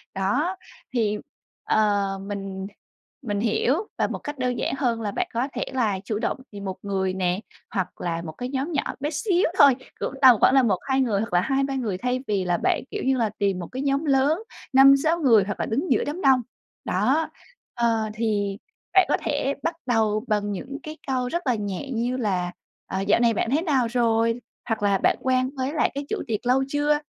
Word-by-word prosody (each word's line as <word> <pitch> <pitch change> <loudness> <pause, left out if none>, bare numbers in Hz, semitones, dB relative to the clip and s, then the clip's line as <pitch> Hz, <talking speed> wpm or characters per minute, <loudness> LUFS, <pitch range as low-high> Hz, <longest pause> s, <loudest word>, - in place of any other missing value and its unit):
Đó, 255 - 0 0.4
thì, 215 -4 +1 0.5
ờ, 210 -2 +2 0.2
mình 195 -1 -5 0.5
mình 205 -6 -2
hiểu 230 +4 +2 0.2
và - - +2
một - - -4
cách 290 0 -6
đơn 250 -2 -1
giản - - -1
hơn 240 -4 0
là 210 -2 -2
bạn - - -1
có 240 +3 0
thể - - -2
là 220 -7 +1
chủ 210 0 -2
động - - -1
tìm 200 -1 -8
1 190 -1 -3
người 190 -2 -1
nè, 185 0 0 0.3
hoặc 190 -4 -3
là 170 -1 -2
1 165 -2 -6
cái 250 +9 -5
nhóm 275 +4 -2
nhỏ 290 - 0 0.2
bé 290 +2 -1
xíu 360 +3 +1
thôi, 280 -3 +7 0.2
cũng - - -3
tầm 260 -3 +9
khoảng - - +5
là 270 -1 +6
1, 205 -6 +2
2 265 0 +1
người 220 -6 +1
hoặc 225 - -5
là 175 - +4
2, 270 +6 +1
3 275 0 -2
người, 225 -8 -2
thay 250 +4 -1
vì 200 -3 0
là 175 -1 +1
bạn, - - +1
kiểu - - -3
như 265 0 +2
là, 230 -3 +1
tìm 195 -3 +1
1 175 - -5
cái 260 - -5
nhóm 280 +2 0
lớn 280 +3 +3 0.3
5, 270 +1 +8
6 325 +2 +2
người 235 - +5
hoặc 200 +1 -5
là - - 0
đứng 280 +11 -1
giữa - - +3
đám 310 +6 -4
đông. 265 -4 +5 0.4
Đó, 260 - +1 0.4
ờ, 225 -2 +1
thì 205 -3 -1 0.4
bạn 380 -1 +6
có - - +3
thể 275 - 0
bắt 330 - -1
đầu 220 -3 +1
bằng 205 -1 0
những 260 +8 -5
cái 310 -1 -7
câu 255 -2 0
rất 345 +1 -3
là 250 - +3
nhẹ 205 +4 -4
như 245 +1 -1
là, 185 -7 -1 0.4
ờ, 190 - -2
"Dạo 205 - +4
này 235 -1 +4
bạn 225 - -1
thế 295 +4 +2
nào 275 -8 +2
rồi?", 230 0 +1 0.3
hoặc 220 -2 -1
là 200 -1 +3
"Bạn - - +2
quen 255 0 +1
với 260 +2 -2
lại 320 - +1
cái 280 +1 -3
chủ - - -1
tiệc 220 0 -2
lâu 255 +2 +3
chưa?", 295 +1 +1
235 Hz, 220 wpm, -24 LUFS, 205-270 Hz, 0.5 s, tầm